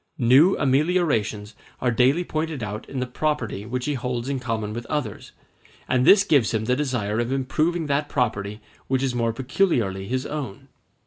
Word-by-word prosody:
New 135 +10 +5
ameliorations 135 - +1 0.3
are 125 - +1
daily 130 +9 +3
pointed 155 -6 -3
out 105 +1 -6
in 135 - -4
the 125 - -1
property 125 -6 -2
which 125 +1 -3
he 150 - 0
holds 125 -1 -3
in 140 -1 -1
common 110 -4 -3
with 120 +1 -6
others, 130 -10 -4 0.6
and 130 -1 +2
this 200 -1 +8
gives 130 - +2
him 110 0 -1
the 125 +2 +2
desire 120 -7 -1
of 120 +1 -1
improving 155 +6 0
that 145 0 0
property 105 -5 -1 0.3
which 130 0 0
is 130 -2 0
more 115 -1 0
peculiarly 120 - 0
his 130 +3 -2
own. 140 -10 -6
125 Hz, 175 wpm, -24 LUFS, 115-145 Hz, 0.6 s, this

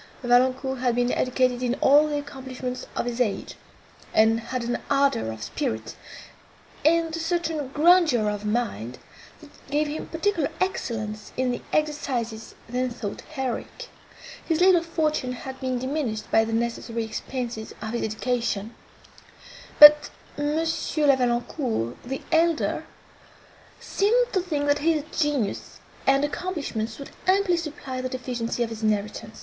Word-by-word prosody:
Valancourt 255 +2 +2
had 245 -2 +1
been 245 0 +1
educated 255 -1 +1
in 250 0 0
all 295 +3 +5
the 295 -1 -1
accomplishments 260 -3 -6
of - - -1
his 240 0 -2
age, 210 -5 -1 0.6
and 220 +1 +5
had 235 +2 -4
an 240 +1 -1
ardour 275 - +2
of 110 -1 -7
spirit, 110 0 -3 0.9
and 330 +1 +3
a - - -4
certain 325 -3 -1
grandeur 305 -5 +4
of 205 0 -2
mind, 210 - -2 0.4
that 300 -2 -14 0.2
gave 295 +2 +1
him 295 +2 -5
particular 330 -2 0
excellence 215 - -3
in 255 -1 +1
the 245 - -4
exercises 255 -7 -2
then 250 +2 -1
thought 225 -4 -6
heroic. 265 - -4 0.5
His 325 -1 0
little 360 -1 +6
fortune 310 -6 -1
had 260 +1 -8
been 255 -1 -1
diminished 255 -4 -3
by 225 0 +4
the 225 - -4
necessary 230 0 -2
expences 230 0 -5
of 220 - -5
his 240 - -2
education; 220 -1 -2 1.0
but 295 0 +10 0.3
M. 290 +1 -1
La 320 -3 +2
Valancourt, 240 - -1
the 265 +2 -5
elder, 330 -1 +2 0.9
seemed 470 +5 +1
to 375 - +2
think 305 -5 -2
that 290 0 +2
his 310 -1 +1
genius 290 -10 -1 0.3
and 275 +1 +4
accomplishments 285 -10 -4
would 280 - -9 0.2
amply 380 -1 +3
supply 305 -6 -5
the 255 - -3
deficiency 245 -2 -2
of 230 - -4
his 225 0 -6
inheritance. 215 0 -2
255 Hz, 140 wpm, -25 LUFS, 230-305 Hz, 1.0 s, but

